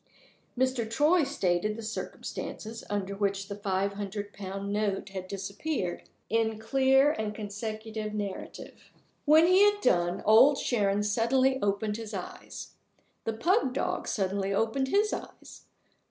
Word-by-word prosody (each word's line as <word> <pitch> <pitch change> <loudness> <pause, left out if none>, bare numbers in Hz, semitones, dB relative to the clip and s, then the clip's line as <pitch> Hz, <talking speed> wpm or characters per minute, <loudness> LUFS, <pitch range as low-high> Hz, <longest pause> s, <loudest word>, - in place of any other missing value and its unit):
Mr. 255 -3 +1
Troy 300 +9 +4
stated 210 - 0
the 230 - -7
circumstances 225 0 -6
under 200 -1 -2
which 195 0 -1
the 200 - -4
five 200 -1 -1
hundred 205 0 -5
pound 195 0 -5
note 205 -1 -1
had 190 -1 -6
disappeared, 200 - -4 0.2
in 225 -1 +1
clear 270 +5 +4
and 215 -6 -3
consecutive 215 +1 -5
narrative. 205 -2 -6 0.3
When 310 +2 +7
he 365 +2 +5
had 410 0 +5
done, 175 - +1
Old 245 +7 +7
Sharon 205 -5 +1
suddenly 255 +5 +2
opened 205 +1 0
his 220 -2 -6
eyes. 180 - -8 0.5
The 225 - -1
pug 270 - +1
dog - - -1
suddenly 195 -1 -1
opened 225 +6 +1
his 415 +8 +2
eyes. - - -8
215 Hz, 135 wpm, -29 LUFS, 200-260 Hz, 0.5 s, When